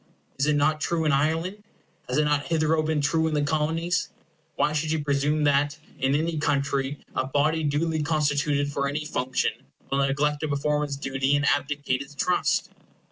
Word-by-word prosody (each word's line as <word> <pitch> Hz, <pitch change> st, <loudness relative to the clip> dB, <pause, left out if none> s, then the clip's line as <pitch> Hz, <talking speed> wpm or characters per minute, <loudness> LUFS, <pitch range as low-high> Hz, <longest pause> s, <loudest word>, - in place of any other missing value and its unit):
Is 140 Hz, -, +2 dB
it 150 Hz, -, +3 dB
not 155 Hz, +2 st, +2 dB
true 165 Hz, -2 st, 0 dB
in 150 Hz, -, +3 dB
Ireland? 165 Hz, +8 st, 0 dB, 0.5 s
Has 125 Hz, -, 0 dB
it 150 Hz, -, +4 dB
not 145 Hz, -1 st, +1 dB
hitherto 160 Hz, -1 st, +2 dB
been 155 Hz, -1 st, 0 dB
true 160 Hz, +2 st, +2 dB
in 155 Hz, -, -1 dB
the 145 Hz, -, +1 dB
Colonies? 160 Hz, +4 st, 0 dB, 0.5 s
Why 150 Hz, -, +1 dB
should 155 Hz, +1 st, -1 dB
you 160 Hz, -2 st, 0 dB
presume 145 Hz, +1 st, +1 dB
that, 145 Hz, 0 st, +2 dB, 0.2 s
in 135 Hz, +1 st, +2 dB
any 160 Hz, +1 st, 0 dB
country, 140 Hz, -1 st, 0 dB, 0.2 s
a 130 Hz, -, 0 dB
body 155 Hz, +4 st, +1 dB
duly 155 Hz, +2 st, 0 dB
constituted 145 Hz, -2 st, +1 dB
for 140 Hz, 0 st, -1 dB
any 150 Hz, +2 st, -3 dB
function 130 Hz, -4 st, 0 dB, 0.4 s
will 135 Hz, -, +1 dB
neglect 145 Hz, +2 st, +1 dB
to 155 Hz, -, -2 dB
perform 150 Hz, +1 st, 0 dB
its 140 Hz, -1 st, -4 dB
duty 135 Hz, 0 st, 0 dB
and 145 Hz, +1 st, +1 dB
abdicate 140 Hz, -3 st, 0 dB
its 140 Hz, +1 st, -10 dB
trust? 180 Hz, +5 st, +1 dB
150 Hz, 185 wpm, -26 LUFS, 140-155 Hz, 0.5 s, it